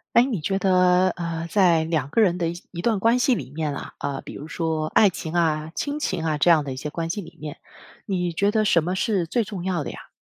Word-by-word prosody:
哎， 235 - +7
你 240 - -2
觉 195 +5 0
得， 185 -1 +4
呃， 165 -2 -4
在 175 -5 +4
2 160 -4 -1
个 185 - 0
人 185 -5 +3
的 170 -1 0
一 - - -4
些 175 - -11 0.2
段 220 0 +1
关 230 +5 +3
系 255 -1 +3
里 130 - -6
面 150 -1 -3
啊， - - -8
呃， 140 -1 -3
比 - - -10
如 150 - -8
说 160 -2 -2
爱 210 - +5
情 170 -3 -4
啊， 160 -2 0
亲 290 +1 -2
情 185 - -2
啊， 155 -1 +1
这 160 - +4
样 160 -3 +5
的 135 -2 -5
一 - - -7
些 140 +3 -5
关 165 +2 -3
系 205 +3 -4
里 165 - -13
面， 155 +1 -7 0.5
你 180 -4 -1
觉 200 +5 +2
得 215 0 +1
什 170 -6 +3
么 180 +3 -2
是 190 -4 0
最 235 +8 +1
重 200 -4 -6
要 180 -4 -1
的 - - -5
呀？ - - -12
175 Hz, 275 characters per minute, -24 LUFS, 160-195 Hz, 0.5 s, 哎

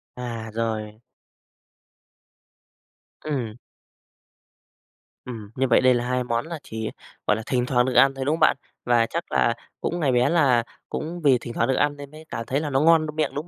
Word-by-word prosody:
À, 115 -3 -5
rồi. 110 -1 -3 2.2
Ừm. 130 -8 -3 1.7
Ừm, 110 -4 -8
như 135 0 +1
vậy 120 - +4
đây 130 0 +5
là 120 0 -1
2 125 0 0
món 120 +3 -1
là 165 -2 -6
chỉ, 110 0 -5 0.4
gọi 105 - +4
là, 110 - -5
thỉnh 125 -2 0
thoảng 125 -1 +2
được 130 - -1
ăn 135 +2 +6
thôi, 135 -1 -4
đúng 145 - +2
không 160 - -2
bạn? 155 -3 +4 0.3
Và 120 -1 +3
chắc 170 +1 -4
là 115 - +3 0.3
cũng 175 - -2
ngày 145 -5 +2
bé 125 +2 +3
là 135 -8 +3 0.3
cũng 170 +2 -5
vì 135 -4 +5
thỉnh 120 0 -8
thoảng 115 - +1
được 130 - +3
ăn 145 +1 +1
nên 140 -1 -10
mới 155 +1 -12
cảm 115 - -4
thấy 135 +2 0
là 150 - -3
nó 135 -1 +2
ngon 160 0 +5
miệng, 155 -2 0
đúng 150 +4 -4
130 Hz, 195 wpm, -24 LUFS, 115-145 Hz, 2.2 s, ăn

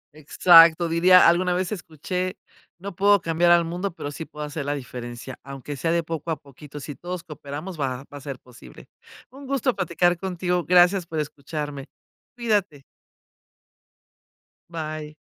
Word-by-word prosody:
Exacto, 165 +2 +6
diría, 180 +2 +6
alguna 175 +1 +3
vez 185 +2 -2
escuché: 180 +1 -4 0.4
"No 195 +1 -8
puedo 200 +2 +4
cambiar 165 0 +1
al 170 -1 +5
mundo, 175 +2 -4
pero 145 -5 -6
sí 160 - -7
puedo 150 0 -7
hacer 150 0 -5
la 145 +1 -2
diferencia, 125 -1 -8
aunque 140 +1 -8
sea 165 +5 -1
de 170 0 +1
poco 165 0 -5
a 160 - +1
poquito, 145 +1 -12
si 145 +1 -7
todos 175 +4 -6
cooperamos 155 +2 -8
va 130 -1 -2
va - - -7
a - - -16
ser 140 -2 -6
posible". 125 -2 -15 0.4
Un 275 +1 -12
gusto 265 -2 0
platicar 175 0 +1
contigo, 180 -1 -2
gracias 180 0 +4
por 160 - -5
escucharme. 145 -1 -5 0.5
Cuídate. 205 - -1 1.9
Bye. 155 -2 -6
165 Hz, 155 wpm, -24 LUFS, 145-180 Hz, 1.9 s, Exacto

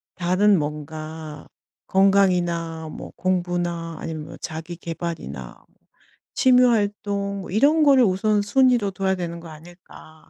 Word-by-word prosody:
다른 185 +3 +3
뭔가 155 +1 -6 0.4
건강이나 175 -4 +2
뭐 - - -9
공부나 175 -2 -2
아니면 155 -2 -5
뭐 - - -11
자기 165 +1 -6
계발이나 165 - -6 0.8
취미 255 -1 +5
활동 205 -3 0
뭐 - - -9
이런 295 +9 +4
거를 270 -3 +6
우선순위로 210 +3 +2
둬야 190 0 -1
되는 170 -2 -5
거 165 - -11
아닐까?' 160 0 -15
175 Hz, 255 characters per minute, -23 LUFS, 160-200 Hz, 0.8 s, 거를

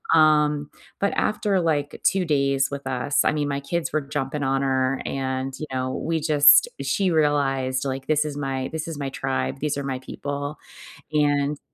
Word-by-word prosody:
Um, 150 -2 +3 0.3
but 200 - +1
after 205 -3 +1
like 150 -4 -1
2 190 -2 +2
days 140 -3 +1
with 140 -1 -6
us- 130 +2 +1
I - - +4
mean, 150 -1 -1
my 140 0 -2
kids 170 +4 -3
were 155 - +1
jumping 140 0 -3
on 135 0 +1
her 130 0 0
and, 130 0 -3
you 155 - -4
know, 130 0 -1
we 165 0 -1
just 150 -1 +6
she 180 +8 +1
realized, 135 -4 +1
like, 135 0 -4
"This 155 0 +2
is 145 -1 -4
my 135 -2 -2
this 160 0 -4
is 150 -3 -6
my 140 - -2
tribe. 135 0 -2
These 150 -1 -1
are 140 - -3
my 130 -2 -3
people," 145 +2 -5 0.6
and 145 -1 +1
145 Hz, 185 wpm, -24 LUFS, 135-150 Hz, 0.6 s, just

